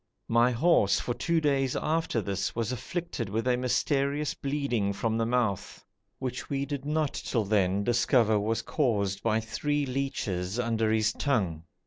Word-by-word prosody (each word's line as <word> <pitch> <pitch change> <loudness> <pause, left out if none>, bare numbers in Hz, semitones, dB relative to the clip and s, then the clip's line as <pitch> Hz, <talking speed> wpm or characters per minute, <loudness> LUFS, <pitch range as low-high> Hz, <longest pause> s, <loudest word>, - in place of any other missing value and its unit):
My 115 +2 +4
horse, 125 - +3
for 120 - -2
two 165 +7 +1
days 140 -4 +1
after 160 -8 0
this, 100 -1 -2
was 115 0 -1
afflicted 130 - -4
with 110 +4 -2
a 125 - +4
mysterious 140 +3 0
bleeding 135 -8 -1
from 110 +2 -1
the 115 0 0
mouth 115 -6 -1 0.3
which 130 -1 -5
we 140 -1 -1
did 140 -1 -5
not 150 -1 0
till 115 -4 -1
then 100 -1 +2
discover 120 -2 +3
was 110 +2 -1
caused 100 -9 0
by 110 -1 +2
three 145 +7 -1
leeches 110 -8 -2
under 115 -2 +1
his 110 -1 +2
tongue. 95 - -1
120 Hz, 155 wpm, -28 LUFS, 110-140 Hz, 0.3 s, My